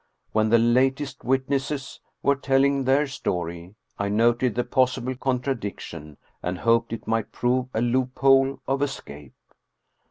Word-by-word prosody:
When 110 0 +2
the 115 - +6
latest 130 +4 +1
witnesses 135 +2 -1 0.2
were 140 - +4
telling 135 0 +2
their 135 +3 +3
story, 90 - -4 0.2
I 100 0 -1
noted 120 +2 +2
the 125 - +1
possible 130 0 0
contradiction, 120 - -4 0.2
and 90 +1 -3
hoped 115 +3 +2
it 115 - -5
might 115 -1 -1
prove 125 +1 0
a 110 - +1
loophole 135 +2 +2
of 135 +1 0
escape. 75 - -5
125 Hz, 130 wpm, -24 LUFS, 110-135 Hz, 0.2 s, the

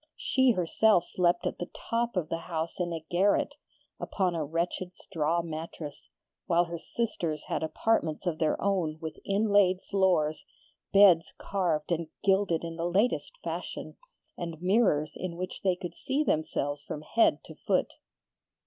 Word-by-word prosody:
She 260 -2 +3
herself 180 0 +3
slept 175 -1 +1
at - - -2
the 175 - -4
top 235 -2 -2
of 170 -4 0
the 165 - -2
house 165 0 -4
in 175 -1 -1
a 165 -1 -3
garret, 200 +10 +2 0.5
upon 185 -3 0
a 165 -2 -1
wretched 170 +4 -2
straw 165 -1 -1
mattress, 160 -2 -7 0.4
while 170 0 +4
her 170 0 -6
sisters 170 -7 -2
had - - -2
apartments 160 0 0
of 170 -3 -1
their 155 -2 +1
own 180 -6 0
with 160 -1 -6
inlaid 200 -2 +3
floors, 180 -6 +2 0.5
beds 195 -5 +6
carved 175 -6 -1
and 170 -1 0 0.2
gilded 190 -4 +2
in 165 0 -5
the 170 +1 -1
latest 205 - +1
fashion, - - -5 0.4
and 170 -3 -5
mirrors 180 -6 +2
in 180 -2 -4
which 185 +1 -5
they 185 -2 +2
could 175 -2 -6
see 275 +10 -1
themselves 145 - -1
from 150 +1 -6
head 230 +8 +3
to - - -11
foot. - - 0
175 Hz, 155 wpm, -29 LUFS, 160-195 Hz, 0.5 s, beds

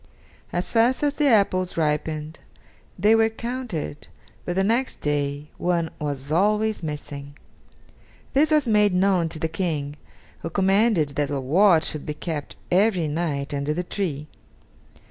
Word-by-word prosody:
As 175 +1 -2
fast 240 +4 +3
as 290 -1 +2
the 295 -1 +1
apples 190 -7 +2
ripened 155 0 -1 0.6
they 210 +4 +4
were 225 0 +4
counted, 225 - -5 0.4
but 175 - -2
the 190 - +2
next 235 +6 0
day 145 0 -2
one 170 -2 0
was 145 -1 -4
always 210 +5 +2
missing. 145 -2 -7 1.0
This 295 +3 +4
was 305 -4 +3
made 210 -3 +3
known 180 -3 +2
to 160 - -5
the 160 - -1
King, 155 -4 -3 0.4
who 165 - -5
commanded 195 -2 +2
that 145 0 -2
a 140 -1 -1
watch 165 +5 +4
should 155 - -4
be 150 - -3
kept 150 -2 -5 0.2
every 185 -3 +3
night 145 -2 -2
under 145 +2 -1
the 180 - -1
tree. 160 -6 -3
170 Hz, 145 wpm, -24 LUFS, 150-210 Hz, 1.0 s, they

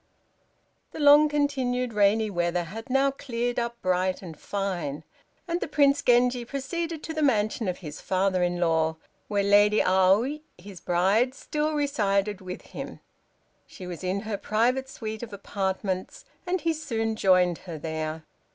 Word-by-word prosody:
The - - -7
long 295 +1 +7
continued 260 -5 0
rainy 210 +1 +3
weather 175 -1 0
had 225 +8 -9
now 270 +1 +3
cleared 245 -3 -3
up 235 0 -3
bright 185 +1 0
and 165 -3 -8
fine, 175 -7 -3 0.4
and 340 +1 -1
the - - -2
Prince 285 -1 +3
Genji 245 0 +3
proceeded 315 +5 -4
to 320 - -5
the 310 - -2
mansion 215 -5 +1
of 180 - -2
his 150 0 -7
father 185 -1 +1
in 175 0 0
law, 160 -2 +2 0.3
where 205 -1 0
Lady 205 +1 +5
Aoi, 195 +11 +3 0.2
his 185 0 -11
bride, 200 +9 +2
still 305 +2 -2
resided 210 -8 0
with 185 -1 -7
him. - - -8 0.7
She 185 - -10
was 180 0 -7
in 185 +2 -1
her 215 -1 -3
private 250 +6 0
suite 220 -4 -6
of 230 -3 -8
apartments, 195 - -3 0.2
and 365 -1 0
he 330 +1 +1
soon 225 -8 -2
joined 180 -4 +3
her 170 -4 -8
there. 160 0 -4
210 Hz, 155 wpm, -26 LUFS, 185-265 Hz, 0.7 s, long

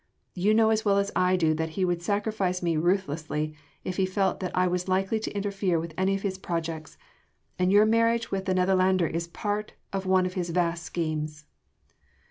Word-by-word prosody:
You 200 +4 +2
know 220 0 +4
as 220 0 +1
well 200 -2 +3
as 200 0 +1
I 185 0 +3
do 160 -3 +2
that 160 0 -3
he 190 - +2
would 175 -1 -1
sacrifice 200 -1 -1
me 170 -2 +1
ruthlessly 155 -3 -1 0.3
if 185 - -4
he 190 -1 +2
felt 190 +1 0
that 185 -1 -4
I 180 - +4
was 180 0 -1
likely 195 +4 +1
to 220 - -4
interfere 195 -4 0
with 165 0 -6
any 190 +2 +1
of 195 - -5
his 190 -2 -2
projects: 165 -3 -4 0.6
and 180 +1 +3
your 205 +2 +6
marriage 230 +1 +2
with 190 -1 -2
the 185 -1 +1
Netherlander 185 -1 +3
is 165 +1 -2
part 205 +4 -3 0.2
of 195 -1 -2
one 185 -1 +4
of 180 - -3
his 180 -2 -2
vast 170 -1 0
schemes." 155 -2 -3
185 Hz, 200 wpm, -27 LUFS, 170-200 Hz, 0.6 s, your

